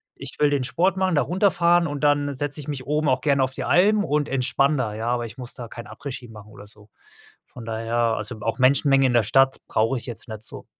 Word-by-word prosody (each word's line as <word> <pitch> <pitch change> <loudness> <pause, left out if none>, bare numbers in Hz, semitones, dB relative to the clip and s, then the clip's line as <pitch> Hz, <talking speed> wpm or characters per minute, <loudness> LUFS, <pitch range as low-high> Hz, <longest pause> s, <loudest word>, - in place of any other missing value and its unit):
ich - - -7
will 150 -1 +4
den 140 -2 0
Sport 180 +8 0
machen 185 -2 +1
da 145 - +3
runterfahren 175 +1 +2
und 145 -1 -5
dann 145 -1 +2
setze 145 +2 -4
ich 145 - -9
mich 135 -3 -5
oben 150 +1 0
auch 130 0 +1
gerne 140 -2 +2
auf 130 - -2
die - - -5
Alm 205 +4 +3
und 150 -5 0
entspanne 135 +2 +1
da, 110 -5 -2
ja, 110 +2 -4
aber 120 -1 0
ich 115 +1 -10
muss 125 -1 -9
da 120 -3 -7
kein 120 +1 -10
Après-Ski 125 +2 -8
machen 105 -1 -13
oder 105 -1 -13
so. 105 0 -16 0.6
Von 120 - -11
daher, 115 +1 -4
also 115 -1 -1
auch 115 +4 -2
Menschenmengen 135 +1 +4
in 125 - 0
der 120 -2 +4
Stadt 135 +4 +3
brauche 115 +4 +1
ich - - -7
jetzt 115 -3 -8
nicht 110 0 -7
so. - - -7
130 Hz, 245 wpm, -23 LUFS, 115-145 Hz, 0.6 s, will